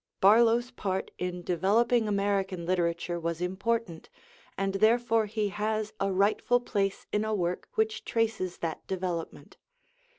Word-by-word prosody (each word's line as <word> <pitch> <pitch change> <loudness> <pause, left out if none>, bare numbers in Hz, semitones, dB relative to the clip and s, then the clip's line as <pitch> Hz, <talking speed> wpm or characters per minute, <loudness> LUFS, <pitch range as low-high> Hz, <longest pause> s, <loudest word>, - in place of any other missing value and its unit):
Barlow's 230 +4 +5
part 190 -6 -3
in 180 -1 -3
developing 215 +7 +2
American 200 -3 0
literature 175 -1 0
was 170 0 -3
important, 190 0 -2 0.5
and 195 0 -1
therefore 225 +2 +3
he 210 0 -1
has 215 +1 -2
a 195 - 0
rightful 205 +5 +2
place 200 -5 -2
in 210 - +1
a 220 0 -1
work 180 -2 -2
which 220 0 0
traces 220 -6 -1
that 160 - -5
development. 180 -3 -4
200 Hz, 130 wpm, -29 LUFS, 180-220 Hz, 0.5 s, Barlow's